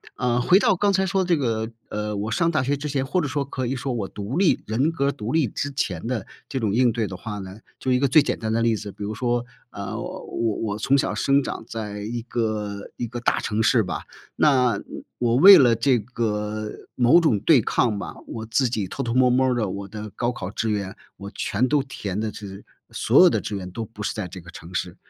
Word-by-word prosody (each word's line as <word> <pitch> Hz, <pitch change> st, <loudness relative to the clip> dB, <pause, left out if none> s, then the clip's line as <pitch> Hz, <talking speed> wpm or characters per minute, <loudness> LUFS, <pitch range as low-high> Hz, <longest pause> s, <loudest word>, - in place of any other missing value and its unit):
呃， 125 Hz, -1 st, +1 dB
回 180 Hz, +10 st, +5 dB
到 195 Hz, -, +3 dB
刚 200 Hz, +2 st, +2 dB
才 190 Hz, 0 st, +2 dB
说 190 Hz, 0 st, +1 dB
的 -, -, -5 dB
这 175 Hz, -, +4 dB
个， 115 Hz, -6 st, -1 dB, 0.2 s
呃， 105 Hz, 0 st, -3 dB
我 105 Hz, +2 st, -3 dB
上 170 Hz, +8 st, +2 dB
大 155 Hz, -4 st, +1 dB
学 140 Hz, +2 st, 0 dB
之 150 Hz, +2 st, -5 dB
前， 135 Hz, -2 st, -1 dB
或 145 Hz, +7 st, 0 dB
者 155 Hz, -, -1 dB
说 145 Hz, +1 st, -1 dB
可 130 Hz, -1 st, -4 dB
以 130 Hz, +3 st, -1 dB
说 130 Hz, +1 st, -3 dB
我 105 Hz, -5 st, -2 dB
独 105 Hz, -, -5 dB
立 190 Hz, -3 st, +3 dB
人 130 Hz, +9 st, +1 dB
格 140 Hz, -4 st, 0 dB
儿 140 Hz, -, +2 dB
独 110 Hz, 0 st, -5 dB
立 160 Hz, -5 st, +3 dB
之 145 Hz, +7 st, -4 dB
前 95 Hz, -9 st, -2 dB
的， 115 Hz, -5 st, -2 dB, 0.2 s
这 135 Hz, -, -3 dB
种 105 Hz, -4 st, 0 dB
应 125 Hz, 0 st, +4 dB
对 115 Hz, -1 st, -1 dB
的 95 Hz, -1 st, -7 dB
话 105 Hz, -1 st, -6 dB
呢 95 Hz, +1 st, -9 dB, 0.2 s
就 130 Hz, -, -1 dB
1 125 Hz, -, +4 dB
个 140 Hz, -, +3 dB
最 140 Hz, +4 st, +6 dB
简 145 Hz, -, -1 dB
单 110 Hz, 0 st, -2 dB
的 115 Hz, -, +1 dB
例 115 Hz, -1 st, +2 dB
子， 105 Hz, -1 st, -6 dB
比 105 Hz, -, -9 dB
如 105 Hz, +2 st, -4 dB
说， 120 Hz, +1 st, 0 dB, 0.3 s
呃， 100 Hz, -1 st, -5 dB
我 -, -, -6 dB
我 115 Hz, -3 st, -1 dB
我 105 Hz, -2 st, -2 dB
从 135 Hz, +6 st, +2 dB
小 140 Hz, -, +1 dB
生 140 Hz, +1 st, +3 dB
长 130 Hz, -, -5 dB
在 105 Hz, -2 st, -5 dB
一 115 Hz, +3 st, -4 dB
个 110 Hz, -4 st, -3 dB
一 120 Hz, -, -3 dB
个 120 Hz, +2 st, -6 dB
大 120 Hz, -, +1 dB
城 110 Hz, +1 st, -1 dB
市 115 Hz, +1 st, +4 dB
吧， 90 Hz, -2 st, -4 dB, 0.3 s
那， 125 Hz, -7 st, +3 dB
嗯， -, -, -8 dB, 0.3 s
我 120 Hz, -1 st, +1 dB
为 195 Hz, +6 st, +10 dB
了 120 Hz, -3 st, +5 dB
这 125 Hz, +3 st, +3 dB
个， 105 Hz, -2 st, -3 dB, 0.2 s
某 125 Hz, +7 st, +5 dB
种 155 Hz, -12 st, +2 dB
对 140 Hz, +7 st, +5 dB
抗 110 Hz, 0 st, +1 dB
吧， -, -, -6 dB
我 110 Hz, -1 st, -6 dB
自 120 Hz, +3 st, +1 dB
己 105 Hz, -5 st, -2 dB
偷 135 Hz, -, -5 dB
偷 120 Hz, -2 st, -2 dB
摸 130 Hz, -1 st, +5 dB
儿 -, -, +2 dB
摸 130 Hz, +1 st, +3 dB
儿 125 Hz, -, +1 dB
地 110 Hz, -4 st, 0 dB
我 100 Hz, +1 st, -5 dB
的 105 Hz, 0 st, -7 dB
高 120 Hz, 0 st, -1 dB
考 95 Hz, -5 st, -6 dB
志 110 Hz, +1 st, -2 dB
愿， 100 Hz, -1 st, -2 dB, 0.2 s
我 100 Hz, 0 st, -8 dB
全 120 Hz, +6 st, 0 dB
都 145 Hz, 0 st, +2 dB
填 105 Hz, -8 st, -5 dB
的 110 Hz, -1 st, -2 dB
是 100 Hz, -1 st, -9 dB, 0.3 s
所 -, -, +4 dB
有 -, -, +8 dB
的 -, -, 0 dB
志 105 Hz, -, -4 dB
愿 90 Hz, -1 st, -7 dB
都 115 Hz, +5 st, -4 dB
不 105 Hz, -1 st, -9 dB
是 -, -, -1 dB
在 105 Hz, -4 st, -4 dB
这 90 Hz, +1 st, -9 dB
个 85 Hz, 0 st, -13 dB
城 85 Hz, +2 st, -11 dB
市。 90 Hz, -1 st, -2 dB
115 Hz, 275 characters per minute, -24 LUFS, 105-130 Hz, 0.3 s, 为